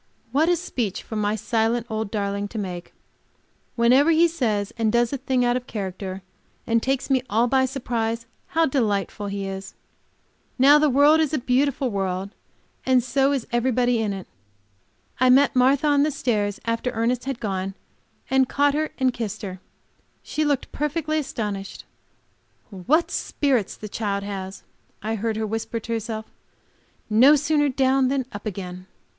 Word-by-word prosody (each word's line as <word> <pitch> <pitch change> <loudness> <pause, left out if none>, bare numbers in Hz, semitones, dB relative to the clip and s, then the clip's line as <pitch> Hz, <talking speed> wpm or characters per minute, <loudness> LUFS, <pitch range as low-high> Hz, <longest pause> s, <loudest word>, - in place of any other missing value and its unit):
What 305 +6 +3
a 350 - +4
speech 250 - -3
for 220 - -7
my 210 0 0
silent 225 +2 0
old 220 -2 -3
darling 200 -1 -2
to 220 - -8
make! 180 -4 -5 0.8
Whenever 250 +6 +4
he 330 +1 +5
says 220 -11 -1
and 225 -2 +1
does 235 +2 +2
a - - -1
thing 260 -1 +1
out 240 0 +2
of 250 0 -4
character, 190 -2 -5 0.4
and 230 0 +2
takes 270 +2 -1
me 260 -1 +3
all 225 +3 +3
by 260 +1 +3
surprise, 230 -3 -2 0.2
how 330 0 +2
delightful 210 -7 -1
he 200 0 -3
is! 195 0 -6 0.8
Now 280 +3 +7
the 305 0 +3
world 290 +4 +5
is 310 -1 +1
a - - +1
beautiful 260 +1 +1
world, 195 0 -2 0.5
and 255 -2 +3
so 270 +2 +2
is 270 -5 -1
everybody 245 -1 +1
in 215 -2 -1
it. 195 -2 -6 0.9
I 255 0 +4
met 275 +2 +5
Martha 265 +4 +4
on 290 -1 +4
the 300 - +3
stairs 210 -8 -1
after 230 +2 -1
Ernest 240 +2 -1
had 270 -3 -3
gone, 195 -2 -3 0.5
and 265 -1 +2
caught 285 0 +2
her 310 +1 0
and 260 -2 +2
kissed 220 -3 -5
her. 185 -2 -6 0.6
She 310 - -2
looked 285 -3 -1
perfectly 310 +1 -1
astonished. 210 -8 -5 0.9
"What 265 - +1
spirits 260 -9 0
the 210 - -7
child 200 -1 -2
has!" 195 -1 -6 0.4
I 220 +1 -1
heard 225 +1 -2
her 220 - -1
whisper 225 +2 -3
to 230 - -4
herself; 220 -1 -4 0.8
"no 250 +7 +6
sooner 295 0 +2
down 265 0 +2
than 265 -1 0
up 205 +1 -7
again." 185 -2 -6
235 Hz, 165 wpm, -23 LUFS, 205-270 Hz, 0.9 s, Now